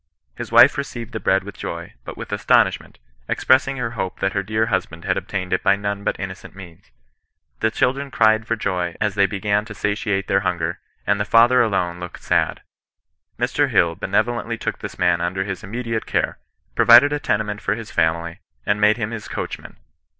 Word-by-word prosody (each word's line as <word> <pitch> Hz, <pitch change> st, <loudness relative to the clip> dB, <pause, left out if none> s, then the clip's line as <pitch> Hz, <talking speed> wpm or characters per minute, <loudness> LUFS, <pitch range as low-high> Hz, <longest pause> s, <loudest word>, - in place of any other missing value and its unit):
His -, -, -7 dB
wife 135 Hz, -, +7 dB
received 120 Hz, -4 st, -6 dB
the 110 Hz, -, -3 dB
bread 95 Hz, -2 st, +2 dB
with 100 Hz, -1 st, -9 dB
joy, 85 Hz, -2 st, -6 dB
but -, -, -8 dB
with -, -, -8 dB
astonishment, -, -, +1 dB, 0.3 s
expressing 135 Hz, +1 st, +2 dB
her 120 Hz, -2 st, -2 dB
hope 95 Hz, -6 st, -4 dB
that 95 Hz, 0 st, 0 dB
her 100 Hz, -, 0 dB
dear 110 Hz, +3 st, 0 dB
husband 90 Hz, -5 st, -3 dB
had -, -, +1 dB
obtained 95 Hz, -2 st, -3 dB
it 90 Hz, -, +1 dB
by -, -, +4 dB
none 100 Hz, 0 st, -4 dB
but -, -, -2 dB
innocent 95 Hz, -1 st, -7 dB
means. 85 Hz, -9 st, -13 dB, 0.7 s
The 110 Hz, -, +2 dB
children 135 Hz, +5 st, 0 dB
cried 110 Hz, -3 st, +3 dB
for 115 Hz, -, 0 dB
joy 90 Hz, -5 st, -2 dB
as 105 Hz, -2 st, 0 dB
they 100 Hz, 0 st, +3 dB
began 105 Hz, +2 st, 0 dB
to 105 Hz, -1 st, -9 dB
satiate 100 Hz, -1 st, -1 dB
their 95 Hz, -, +3 dB
hunger, 85 Hz, -3 st, -2 dB, 0.3 s
and 100 Hz, 0 st, +1 dB
the -, -, +1 dB
father 115 Hz, +5 st, +5 dB
alone 90 Hz, -6 st, 0 dB
looked 90 Hz, -1 st, -9 dB
sad. -, -, 0 dB, 0.7 s
Mr. -, -, +1 dB
Hill 85 Hz, -1 st, +3 dB
benevolently 115 Hz, +6 st, -1 dB
took -, -, -4 dB
this -, -, -7 dB
man 85 Hz, -1 st, +2 dB
under 90 Hz, +2 st, -1 dB
his 95 Hz, -2 st, -6 dB
immediate 115 Hz, +2 st, -4 dB
care, -, -, -1 dB, 0.3 s
provided 125 Hz, +5 st, +7 dB
a 145 Hz, -, -1 dB
tenement 105 Hz, -4 st, -1 dB
for 100 Hz, -, 0 dB
his 115 Hz, -1 st, -8 dB
family, 85 Hz, +2 st, 0 dB, 0.3 s
and 105 Hz, 0 st, 0 dB
made 105 Hz, +1 st, +4 dB
him 110 Hz, -1 st, -3 dB
his 110 Hz, -3 st, -6 dB
coachman. -, -, -6 dB
100 Hz, 190 wpm, -21 LUFS, 95-115 Hz, 0.7 s, wife